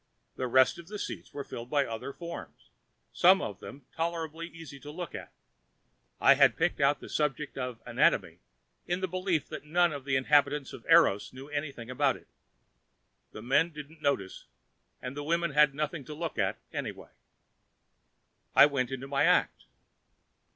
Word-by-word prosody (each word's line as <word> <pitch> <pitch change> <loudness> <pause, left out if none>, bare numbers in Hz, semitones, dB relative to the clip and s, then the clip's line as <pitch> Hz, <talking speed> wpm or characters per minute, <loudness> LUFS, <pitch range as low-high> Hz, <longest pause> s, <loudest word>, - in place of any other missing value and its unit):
The 130 - -2
rest 130 +5 +4
of 170 - -11
the 210 +2 -6
seats - - -6
were 145 - -5
filled 120 -2 -8
with 145 -1 +2
other 115 +4 -5
forms, 170 +3 -9 0.4
some 185 +2 +6
of 100 - -5
them 135 -1 -11
tolerably 165 0 -3
easy 165 -4 -11
to 145 - -10
look 170 +2 -6
at. - - -8 0.9
I - - +7
had 140 -3 +4
picked 165 -2 0
out 140 +1 +3
the - - -9
subject 150 -1 -2
of 125 -3 -4
anatomy - - +2 0.5
in 175 +1 -1
the 190 - 0
belief 185 -4 -1
that - - -7
none 170 +2 +2
of 140 -2 -6
the 135 -1 +1
inhabitants 140 +1 +2
of - - -10
Eros 100 +5 +5
knew 135 +2 -10
anything 145 -5 -5
about 125 - +2
it. - - -21 1.0
The 110 - -9
men 135 +7 +3
didn't 150 0 -11
notice 120 -11 -1 0.6
and 125 +1 -5
the 145 - -4
women 170 +2 0
had 150 -1 +4
nothing 150 +1 -2
at 135 - -16
all 150 - -6
to - - -13
look 165 -8 -4
at, 95 -1 0 0.2
anyway. - - -6 1.4
I 140 - +10
went 140 -4 0
into 135 0 -5
my 140 0 +2
act. - - +2
145 Hz, 175 wpm, -29 LUFS, 135-165 Hz, 1.4 s, I